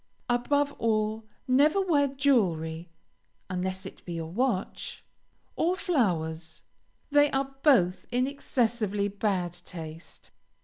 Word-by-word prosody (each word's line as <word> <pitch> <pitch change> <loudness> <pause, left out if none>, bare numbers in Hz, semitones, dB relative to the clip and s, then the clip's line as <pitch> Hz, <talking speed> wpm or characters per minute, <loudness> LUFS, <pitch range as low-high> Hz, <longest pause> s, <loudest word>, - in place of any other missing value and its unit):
Above 285 +4 +1
all, 220 -1 0 0.2
never 290 +8 +4
wear 315 -7 +3
jewelry, 180 - +1 0.6
(unless 185 +1 -2
it - - -10
be 175 - -6
your 165 -1 -5
watch,) 225 -2 -2 0.5
or 350 +3 +1
flowers; 170 - -1 0.5
they 290 0 +5
are 270 0 -2
both 185 - +3
in 250 +1 +1
excessively 230 -7 0
bad 195 -4 -1
taste. 165 -2 -9
220 Hz, 105 wpm, -28 LUFS, 180-275 Hz, 0.6 s, they